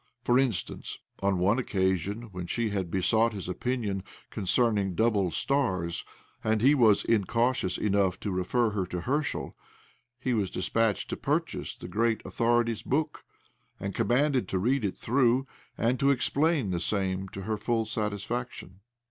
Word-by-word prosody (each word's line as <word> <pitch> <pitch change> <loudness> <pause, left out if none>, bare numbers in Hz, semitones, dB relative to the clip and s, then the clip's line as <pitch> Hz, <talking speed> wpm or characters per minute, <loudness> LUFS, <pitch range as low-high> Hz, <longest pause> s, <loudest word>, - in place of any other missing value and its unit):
For 125 +1 +4
instance, 125 -9 -2 0.2
on 100 -1 +1
one 100 +7 +2
occasion, 95 -1 0
when 90 -1 -6
she 115 +3 -1
had 95 -4 -2
besought 110 +6 +2
his 100 -3 -5
opinion 105 0 -2 0.3
concerning 105 -2 +1
double 105 -4 +2
stars, 95 -8 0 0.4
and 110 0 +2
he 140 +3 +7
was 115 -7 +4
incautious 115 -1 +1
enough 100 -3 +1
to 105 - -2
refer 105 +6 +1
her 95 -3 -2
to 90 -1 -4
Herschel, 145 - -2 0.6
he 130 0 -1
was 105 -5 0
dispatched 105 +4 0
to - - -2
purchase - - -2
the - - -9
great 110 +5 0
authority's 115 -1 +1
book, 150 +6 -1 0.6
and 100 0 -4
commanded 130 -3 +2
to 95 - -1
read 125 +7 +1
it 100 - -2
through, 125 +1 +2 0.3
and 120 +2 +1
to 140 - +3
explain 140 - +2
the 85 - -1
same 95 +1 -1
to 95 - -7
her 110 +2 -1
full 115 +1 0
satisfaction. 105 -2 -4
110 Hz, 150 wpm, -28 LUFS, 95-120 Hz, 0.6 s, he